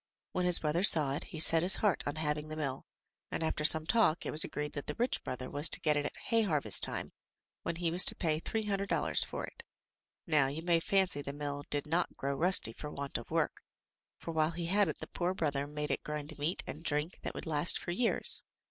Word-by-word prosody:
When 180 -1 -1
his 180 - +8
brother 155 +3 -1
saw 155 -8 +5
it, 140 - -5
he 160 - -8
set 165 +1 +6
his 180 +4 +3
heart 205 -5 0
on 145 - -3
having 150 -1 -3
the 155 - -7
mill, 140 -4 -5 0.4
and, - - -4
after 160 -1 -2
some 160 0 +6
talk, 195 -6 +2
it - - -3
was 155 - +3
agreed 150 0 -5
that 145 - -7
the - - -4
rich 245 +2 -2
brother 130 0 -6
was 145 +3 +5
to - - +5
get 155 -2 +1
it 145 0 -1
at - - -9
hay 230 -1 0
harvest 150 - +1
time, - - +1 0.5
when - - -3
he 170 -1 -2
was 180 +2 +5
to - - +10
pay 155 -3 -1
three 220 +6 -3
hun 205 -2 -1
dred 200 0 -4
dollars - - 0
for - - -5
it. - - -12 0.6
Now, 150 -5 +2
you 150 +4 -6
may 170 -1 +2
fancy 190 -4 0
the 140 0 -6
mill 145 0 -6
did 145 -1 +2
not 165 +3 -2
grow 140 +1 -2
rusty 160 -6 +1
for 150 - -8
want 140 -1 -5
of - - -12
work, - - -1 0.6
for 165 - -7
while 155 -1 +1
he 170 0 -5
had 200 +3 +2
it 155 - -4
the - - -8
poor 180 +1 -3
brother 145 -4 -2
made 150 0 -4
it - - -2
grind 150 0 -6
meat 155 +6 -2
and 155 - -9
drink 150 +2 -2
that - - -6
would - - -7
last 155 0 +4
for - - -5
years. 230 +6 +1
155 Hz, 245 wpm, -32 LUFS, 145-175 Hz, 0.6 s, to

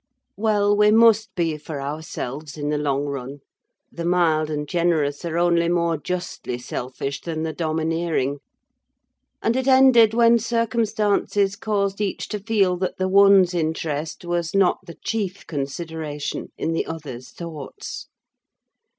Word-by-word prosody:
Well, 205 -1 +2
we 210 0 +5
must 225 0 +5
be 165 -3 0
for 150 -1 -6
ourselves 145 0 -5
in 145 0 -2
the 150 - 0
long 140 -1 0
run; 140 0 -6 0.5
the 170 - -6
mild 165 -3 +2
and 150 -1 -3
generous 160 -4 0
are 165 0 -2
only 170 -1 +3
more 170 -1 +1
justly 175 -6 -4
selfish 130 +3 -5
than 160 -2 -4
the 160 -1 -2
domineering; 160 -3 -1 1.0
and 230 - +2
it 260 0 -1
ended 260 -4 +6
when 235 0 +5
circumstances 215 -3 0
caused 200 -1 -1
each 200 -2 -2
to 210 - -3
feel 200 -4 +1
that 185 0 -3
the 185 - 0
one's 195 -1 +6
interest 160 -1 -2
was 175 0 -2
not 195 -2 +3
the 170 - -9
chief 200 -4 -2
consideration 150 0 -5
in 165 - -1
the 165 - -1
other's 140 -6 -7
thoughts. 160 -5 -8
170 Hz, 140 wpm, -23 LUFS, 150-200 Hz, 1.0 s, ended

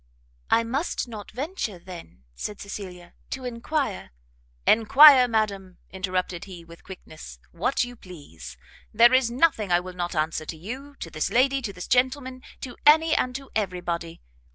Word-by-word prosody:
"I 230 - +4
must 265 +5 -2
not 215 -3 -9
venture 260 - -4
then," 170 - -12
said 200 - -6
Cecilia, 185 -4 -9 0.2
"to 260 -1 -5
enquire 245 - -3 0.3
" - - -38
"Enquire, 270 +3 +8
madam," 200 -5 -2
interrupted 185 -2 -3
he, 180 -4 -11
with 170 0 -15
quickness, 155 - -11
"what - - 0
you 245 0 -7
please: 145 - -12 0.3
there 235 +3 +6
is 255 -2 +4
nothing 235 - +1
I 175 - +5
will 180 +1 -8
not 175 0 -4
answer 155 0 -2
to 160 - -6
you, 260 - -8
to 165 - -6
this 155 - -2
lady, 270 +2 +2
to 225 -5 -4
this 180 -2 -8
gentleman, 255 +1 0 0.2
to 250 -2 -8
any 315 +2 +5
and 250 -1 -1
to 275 0 -8
every 185 -4 -2
body. 170 -1 -5
210 Hz, 165 wpm, -25 LUFS, 175-255 Hz, 0.3 s, Enquire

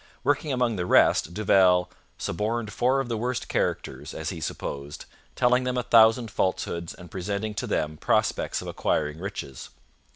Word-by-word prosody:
Working 145 +2 +1
among 125 -4 0
the 90 0 -2
rest, 80 - +4
Duval 95 -3 +4 0.3
'suborned 110 +4 -2
four 130 +5 +2
of 135 - -5
the 115 -2 -2
worst 125 +1 -2
characters, - - -2
as - - -3
he - - -7
supposed, 70 +1 -5 0.3
telling 125 0 +3
them 125 0 -1
a 125 - 0
thousand 115 0 +5
falsehoods 85 -2 -2
and 90 -1 -13
presenting 100 +3 -3
to - - -4
them 75 0 -1
prospects - - 0
of - - -8
acquiring 75 +1 -1
riches.' 85 - -6
105 Hz, 160 wpm, -26 LUFS, 90-125 Hz, 0.3 s, thousand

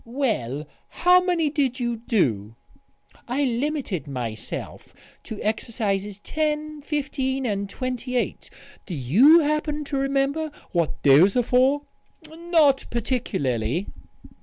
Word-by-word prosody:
"Well, 215 - -2 0.2
how 360 +1 +4
many 335 -5 +1
did 275 -4 0
you 240 -1 -1
do?" 120 - 0 0.7
"I 265 +4 0
limited 250 - -2
myself 115 -5 -6 0.3
to 220 - -7
exercises 210 -2 -2
10, 305 +1 -2
15 270 -3 -2
and 200 -3 -2
28. 250 +2 -3 0.4
Do 180 - -4
you 225 - +6
happen 300 0 -1
to 285 -1 -3
remember 275 +3 0 0.2
what 170 -3 -1
those 150 +8 +6
are 245 - +3
for?" 260 +4 +3 0.5
"Not 320 -5 +2
particularly." 185 - -1
250 Hz, 110 wpm, -24 LUFS, 195-295 Hz, 0.7 s, you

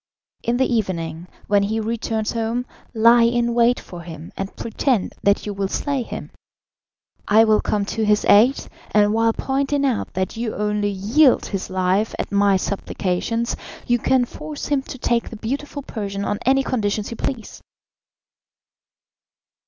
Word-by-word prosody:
In 235 +1 0
the 260 - +3
evening, 175 -8 -2 0.2
when 205 0 +3
he 215 +3 -1
returns 220 -1 -2
home, 230 +2 -2 0.3
lie 230 +1 +5
in 235 0 +2
wait 240 +1 +3
for 175 -1 -10
him 165 -1 -9
and 195 0 -5
pretend 230 -1 -1
that 200 0 +2
you 205 - -3
will 195 0 -1
slay 280 +6 -1
him. 235 - -7 1.0
I 215 +2 +6
will 215 -1 +3
come 205 -1 0
to 220 +2 -2
his 210 0 +2
aid, 235 +7 +5 0.2
and 210 0 +3
while 225 0 +3
pointing 275 +3 0
out 255 -5 -1
that 185 +3 -2
you 230 -1 -3
only 210 0 0
yield 225 +9 +3
his 195 -2 -4
life 185 +3 0
at - - -4
my 200 -1 +4
supplications, 200 +4 -2 0.3
you 240 0 +2
can 255 +1 +2
force 300 +4 -7
him 285 -2 +2
to 265 - -9
take 235 -1 0
the 225 - -8
beautiful 280 +5 -4
Persian 200 -5 -4
on 205 - -1
any 270 +1 +4
conditions 210 -4 -1
you 230 - -6
please." 235 -5 -5
220 Hz, 160 wpm, -21 LUFS, 200-240 Hz, 1.0 s, I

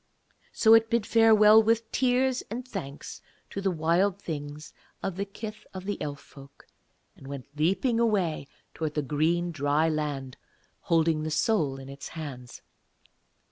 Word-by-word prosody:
So 220 -1 +5
it 225 0 +5
bid 230 -2 +1
farewell 220 -1 +6
with 225 0 0
tears 255 0 +1
and 245 +4 -5
thanks 160 - -7 0.3
to 195 - -4
the 195 - +1
Wild 175 +4 +1
Things 150 -4 -7 0.3
of 190 - -2
the 200 +2 -2
kith 215 +2 -8
of 190 +1 -7
Elf 145 -2 -4
folk, 140 0 -16 0.5
and 135 - -14
went 140 -2 -7
leaping 195 - +1
away 190 -11 0 0.3
towards 155 -2 -4
the 150 - 0
green 165 +5 0
dry 150 +1 +1
land, 145 -4 -3 0.4
holding 165 -2 +1
the 155 - -3
soul 155 - +1
in 135 0 -10
its 140 +1 -8
hands. 130 -6 -8
165 Hz, 145 wpm, -27 LUFS, 145-215 Hz, 0.5 s, farewell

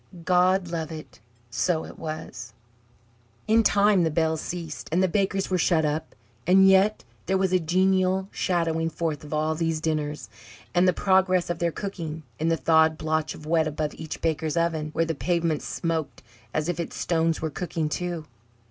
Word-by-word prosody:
God 180 0 +3
love 165 -2 -3
it, 155 -1 -9 0.3
so 160 +7 0
it - - -12
was! 130 -7 -6 0.9
In 225 +1 +5
time 205 -2 +4
the 165 - +2
bells 160 0 0
ceased, 170 -3 -6
and 180 +3 +2
the - - +4
bakers 195 +1 0
were 185 - +2
shut 160 -2 +3
up; 155 +2 -3 0.3
and 190 +1 +6
yet 195 +3 +4 0.2
there 190 - +2
was 190 -1 +1
a 185 - +4
genial 185 +2 +2
shadowing 165 -3 0
forth 160 -2 -3
of 150 - -11
all 155 +1 0
these 165 0 -1
dinners, 155 -2 -2 0.5
and 180 +1 +4
the - - +6
progress 185 -1 +2
of 170 - -4
their 170 -1 +1
cooking, 165 -5 -5 0.2
in 160 - 0
the 165 0 +2
thawed 160 0 +3
blotch 155 -1 -1
of 150 - -12
wet 160 0 +2
above 155 0 -3
each 160 -1 -7
baker's 160 0 -1
oven, 165 -2 0
where 165 - +1
the 165 - -1
pavement 165 -1 0
smoked 160 -7 -3 0.3
as 155 +3 -1
if 175 - -2
its 170 - -4
stones 165 -1 +1
were 160 -1 -3
cooking 165 -1 -2
too. 175 0 -3
165 Hz, 180 wpm, -25 LUFS, 155-180 Hz, 0.9 s, and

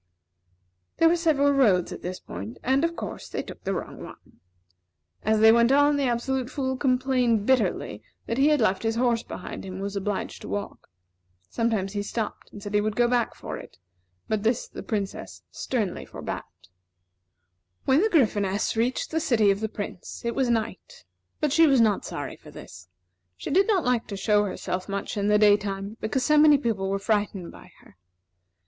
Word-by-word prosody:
There 330 - +5
were 335 - +4
several 305 -4 +2
roads 215 -11 +3
at - - -7
this 180 +1 -5
point 100 +6 -8
and, 265 +4 +2
of 335 0 0
course, - - -7
they - - -3
took - - -11
the 195 0 -1
wrong - - -6
one. - - -14 0.8
As 215 0 +1
they 220 0 +8
went 235 +2 +4
on, 290 +1 +5
the 285 -1 +1
Absolute 250 +1 -1
Fool 260 -2 -2
complained 255 -4 +1
bitterly 215 - +1 0.2
that 230 +3 -2
he 280 - +5
had 300 -1 +4
left 190 -3 +2
his 225 0 -1
horse 235 -1 +2
behind 185 - -8
him, 190 - -7
and 190 - -5
was 200 0 -4
obliged 200 0 -3
to - - -8
walk. 205 0 -5 0.6
Sometimes 215 -4 -1
he 205 - -1
stopped, 215 +2 -5
and 205 - -11
said 205 -1 -6
he 205 - +3
would 215 0 -2
go 240 +1 +3
back 240 -1 +1
after - - -6
it; - - -12 0.5
but 215 -1 0
this 225 +2 0
the - - -9
Princess 205 -3 -4
sternly 215 -8 -2
forbade. - - -5 1.4
When 270 +4 +4
the 440 - +2
Gryphoness 205 - +1
reached 235 +3 -1
the 320 - +1
city 225 -10 +3
of 195 - -1
the 220 0 -2
Prince, 205 +1 -7
it 235 - 0
was 265 -3 0
night; 235 - -3 0.3
but 300 -3 0
she 325 0 +6
was 270 -3 +4
not 215 -3 +2
sorry - - -6
for - - -15
this. 85 0 -12 0.5
She - - -6
did 385 +6 +4
not 395 -6 +2
like 245 -2 +1
to 200 - -5
show 210 +1 +2
herself 185 -1 -4
much 200 +2 -3
in 205 -1 0
the 210 0 +4
daytime, 205 0 +2
because 245 +4 -1
so 300 0 +4
many 300 -1 +7
people 220 -7 -1
were 195 - 0
frightened 205 -3 -1
by - - -14
her. 95 - -21
225 Hz, 195 wpm, -26 LUFS, 200-265 Hz, 1.4 s, they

